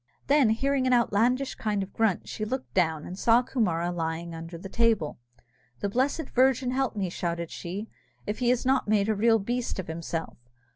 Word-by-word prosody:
Then 280 -5 +4
hearing 265 +4 +1
an 255 - +3
outlandish 240 +3 +2
kind 210 -2 -1
of 190 - -8
a - - -30
grunt, 220 -5 0
she 215 - -5
looked 255 +4 -4
down, 160 -4 +1
and 185 +2 -7
saw 235 +1 +5
Coomara 175 -10 0
lying 165 0 -3
under 165 +1 -7
the 185 - -8
table. 220 - +1 0.6
"The 200 - 0
blessed 270 +8 0
Virgin 255 0 +3
help 265 -2 0
me," 195 -3 -1
shouted 170 -1 -3
she, 195 +6 -5 0.4
"if 210 - -3
he 245 -1 +2
has 250 0 +1
not 265 -2 +2
made 210 0 +2
a - - +3
real 225 +2 +4
beast 240 +4 -2
of 190 - -3
himself! 165 -2 -5
215 Hz, 195 wpm, -27 LUFS, 175-250 Hz, 0.6 s, saw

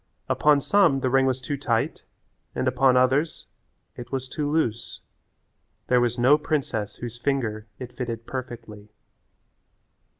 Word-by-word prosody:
Upon 150 -1 +3
some 165 -7 +3
the 130 - 0
ring 135 0 +4
was 130 -1 0
too 140 +3 -4
tight 115 -5 -1 0.5
and 130 - -1
upon 130 0 +3
others 135 +5 +1 0.5
it 120 0 -9
was 130 -1 -3
too 145 +2 -3
loose. 120 -7 -1 0.9
There 125 -1 +4
was 120 0 0
no 130 +5 +5
princess 125 -9 -2
whose 120 0 -8
finger 115 -6 -1
it 125 -1 -8
fitted 115 -2 -5
perfectly. 115 -5 -8
130 Hz, 135 wpm, -25 LUFS, 120-140 Hz, 0.9 s, no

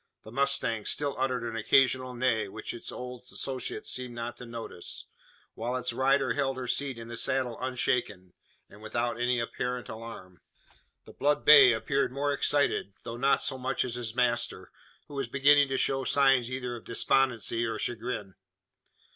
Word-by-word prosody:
The 110 - -11
mustang 125 -4 +1
still 145 -1 +1
uttered 130 -2 0
an 115 -1 -4
occasional 130 +2 +3
neigh, 120 -3 +1
which 110 +3 -6
its 120 - -7
old 125 -1 -7
associates 130 -2 -4
seemed 125 -1 -5
not 120 0 -4
to 125 - -10
notice; 115 -6 -6 0.5
while 120 +3 -3
its 125 -1 -2
rider 130 0 +2
held 135 0 -1
her 130 - -4
seat 135 0 -1
in 115 0 -8
the 120 - -6
saddle 125 0 -1
unshaken, 120 -8 -1 0.3
and 105 - -16
without 120 +2 -2
any 120 0 +1
apparent 125 +1 -3
alarm. 110 -5 -9 0.6
The - - -13
blood 145 +2 +1
bay 140 -4 +9
appeared 135 +5 0
more 140 +2 0
excited, 140 -8 +1
though 115 0 -6
not 135 +3 +3
so 130 - -1
much 130 0 -1
as 125 - -4
his 120 -2 -4
master; 120 -1 0 0.4
who - - -12
was 140 -1 -2
beginning 140 +1 +5
to 135 0 -1
show 135 0 +1
signs 135 -3 +3
either 125 -1 -4
of 115 - -10
despondency 120 -2 +1
or 115 -1 -3
chagrin. 115 -3 -4
125 Hz, 170 wpm, -29 LUFS, 115-135 Hz, 0.6 s, bay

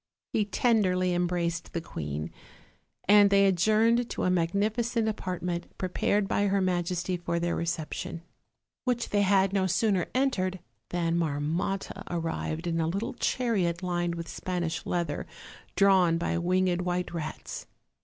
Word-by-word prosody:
He 215 - +2
tenderly 190 -5 +2
embraced 175 -1 -1
the 170 - -1
queen, 75 - -5 0.8
and 205 0 +7
they 200 0 +5
adjourned 220 +6 +3
to - - -3
a 180 - +2
magnificent 215 +7 +1
apartment 180 -4 -3
prepared 195 +2 0
by 205 +1 +1
her 200 0 +2
majesty 180 0 0
for 170 -1 -2
their 170 0 0
reception, 165 0 -3 0.6
which 245 -2 -1
they 205 - +2
had 195 -1 +3
no 190 -2 +2
sooner 195 -1 +1
entered 190 -9 +1 0.3
than 170 -1 0
Marmotta 165 +6 -2
arrived 165 -1 -3
in 165 -1 0
a 160 - 0
little 200 +10 -2
chariot 195 -10 0
lined 175 -1 -1
with 170 -1 -6
Spanish 175 -3 -3
leather, 170 -4 -2 0.5
drawn 185 -4 +5
by 170 - -1
winged 180 0 +1
white 180 -1 -2
rats. 155 -2 -5
180 Hz, 135 wpm, -28 LUFS, 170-200 Hz, 0.8 s, and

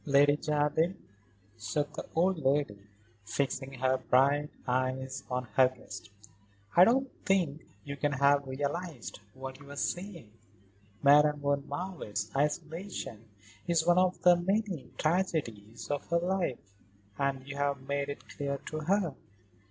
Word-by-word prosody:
"Lady 145 0 +5
Jardine," 150 +4 +1 0.6
said 110 +7 -2
the - - -6
old 180 +1 +3
lady, 135 -8 0 0.4
fixing 135 +4 -2
her 130 0 +1
bright 140 +4 +3 0.2
eyes 130 +1 -1
on 125 0 -1
her 130 +2 +6
guest, 110 -5 -10 0.7
"I 180 - +9
don't 265 +5 +3 0.2
think 170 -6 +1 0.2
you 140 0 -5
can 145 +1 0
have 140 +1 +3
realised 145 - -4 0.2
what 130 0 -7
you 145 - -13
were 145 - -9
saying. 170 - -4 0.7
Madame 150 +1 +6
von 140 0 0
Marwitz's 145 - -4
isolation 150 - -3 0.4
is 170 -2 +2
one 175 +1 +5
of 185 0 +2
the 180 0 +8
many 185 - -1
tragedies 145 - -1
of 145 - -2
her 170 - +2
life, 175 -7 0 0.6
and 135 -1 -1
you 140 0 -6
have 140 -2 -1
made 140 0 -1
it 140 - -7
clear 140 -1 -3
to 155 - -3
her." 175 0 +1
145 Hz, 135 wpm, -31 LUFS, 130-170 Hz, 0.7 s, I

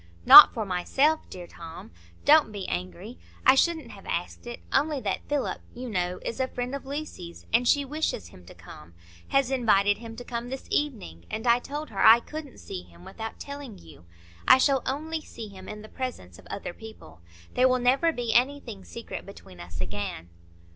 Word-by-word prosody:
"Not - - +12
for 220 -3 -4
myself, 270 - +1
dear 180 -1 -8
Tom. 165 - -11 0.3
Don't 300 -6 +6
be 200 -3 -6
angry. 90 -1 -6 0.3
I - - +8
shouldn't 315 -2 +1
have 195 - -13
asked 175 +7 -4
it, 240 - -7
only 295 +1 +2
that 195 -6 -3
Philip, 290 -2 -1
you 245 -1 -6
know, 180 -2 -2
is 230 - -4
a 260 - +1
friend 250 0 -5
of 280 -1 -6
Lucy's 275 - -7
and 240 +2 +3
she 285 +2 +3
wishes 290 - -3
him 90 +1 -16
to - - -13
come, 80 +3 -14 0.3
has 270 -1 +1
invited 205 -5 +3
him 225 -1 -9
to 245 - -8
come 240 0 -5
this 265 +1 -6
evening; 210 - -2
and 220 - -5
I 235 0 +5
told 295 +2 -6
her 195 - -1
I 225 +2 +9
couldn't 305 +1 -9
see 90 - -7
him 85 0 -18
without 225 0 -7
telling 280 -6 -8
you. 80 +1 -16 0.4
I - - +9
shall 270 0 +3
only 315 +4 -3
see 225 -7 -9
him 190 -1 -11
in 210 0 -8
the - - -10
presence 215 - -7
of - - -16
other 185 - -5
people. 175 - -13 0.3
There 255 - +4
will 255 0 +2
never 260 +7 +3
be 240 -6 -2
anything 245 -5 0
secret 235 +3 -8
between 95 - -13
us 85 -1 -9
again." 95 -4 -5
235 Hz, 195 wpm, -26 LUFS, 180-270 Hz, 0.4 s, Not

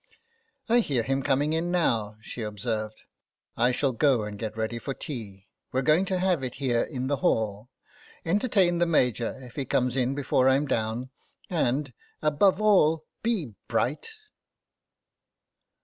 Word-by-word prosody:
" 455 -12 -44
I 235 +2 +4
hear 135 - 0
him 135 +3 0
coming 145 +3 +1
in 165 +2 0
now," 115 -12 0
she 120 - -7
observed. 110 0 -4 0.3
" - - -66
I 120 +2 +3
shall 135 +2 +1
go 125 -2 +2
and 105 -1 -6
get 110 0 -5
ready 110 +1 -2
for 135 +2 -5
tea. 100 -9 -7 0.3
We're 130 +1 0
going 155 +8 +4
to 190 -1 -1
have 180 -6 +1
it 125 - -4
here 125 -4 +1
in 130 -4 -3
the 140 +1 0
hall. 110 -1 0 0.6
Entertain 185 -2 +2
the 175 - +3
Major 125 -6 +1
if 125 -2 -12
he 140 - 0
comes 125 0 +1
in 130 0 +1
before 135 -2 +1
Fm 135 +2 +3
down, 115 +2 -2 0.4
and, 140 -4 0 0.3
above 155 +6 +3
all, 165 -7 +4 0.2
be 200 - -1
bright." 120 - -1
135 Hz, 160 wpm, -27 LUFS, 115-160 Hz, 0.6 s, I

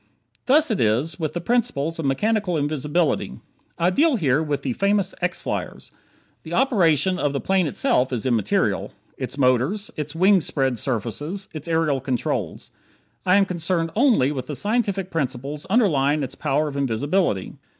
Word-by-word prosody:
Thus 295 +1 +4
it 215 - 0
is, 125 +10 +1
with 155 -3 -2
the 175 - -2
principles 165 - 0
of 160 - -2
mechanical 190 +6 0
invisibility. 150 +2 -1 0.4
I 170 +2 +2
deal 295 - +3
here 150 - +2
with 150 -3 -2
the 130 - -1
famous 200 - +1
X 180 0 -2
flyers. - - -5 0.5
The 165 +2 -5
operation 190 - +2
of 145 -3 0
the 140 - -1
plane 190 0 +1
itself 130 -1 +1
is 120 -2 -2
immaterial; 115 -6 0 0.2
its - - -5
motors; 135 - +1
its 150 0 -5
wing 190 +2 +4
spread 135 -6 -1
surfaces; 145 - -3
its 155 0 -7
aerial 160 -5 +1
controls. 130 -1 -3 0.6
I 185 - +5
am 200 0 +5
concerned 170 -2 -1
only 225 - +3
with 130 -3 -5
the 150 - -4
scientific 200 - -1
principles 140 -1 -3
underlying 155 - +2
its 130 - -5
power 150 +3 0
of 145 - -6
invisibility. 140 - -1
160 Hz, 160 wpm, -23 LUFS, 135-190 Hz, 0.6 s, I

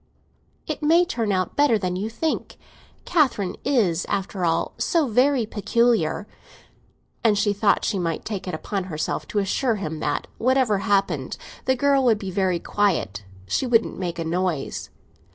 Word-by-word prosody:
"It - - -4
may 330 +4 +4
turn 230 -9 -1
out 185 -1 -1
better 285 -6 +4
than 185 -3 -2
you 200 +4 -2
think. 315 +7 -3 0.5
Catherine 260 - +1
is, 205 -11 +1
after 195 -1 -2
all, 165 -1 +1
so 330 -5 +2
very 250 +1 +3
peculiar." 215 -3 +1 1.0
And 215 -3 +4
she 205 0 +2
thought 205 0 +2
she 200 - 0
might 165 -3 -2
take 200 -4 -4
it 180 - -2
upon 195 +3 -3
herself 155 -4 -3
to - - -4
assure 220 +4 +1
him 160 -6 -4
that, 145 -1 -1
whatever 255 -4 +2
happened, 195 - 0 0.3
the 260 - +3
girl 275 +1 +3
would 230 -3 +4
be 195 -3 -5
very 185 -2 +1
quiet—she 100 - -1
wouldn't 230 -4 +2
make 175 -2 -3
a 165 - -3
noise. 170 -3 -2
205 Hz, 155 wpm, -23 LUFS, 180-235 Hz, 1.0 s, may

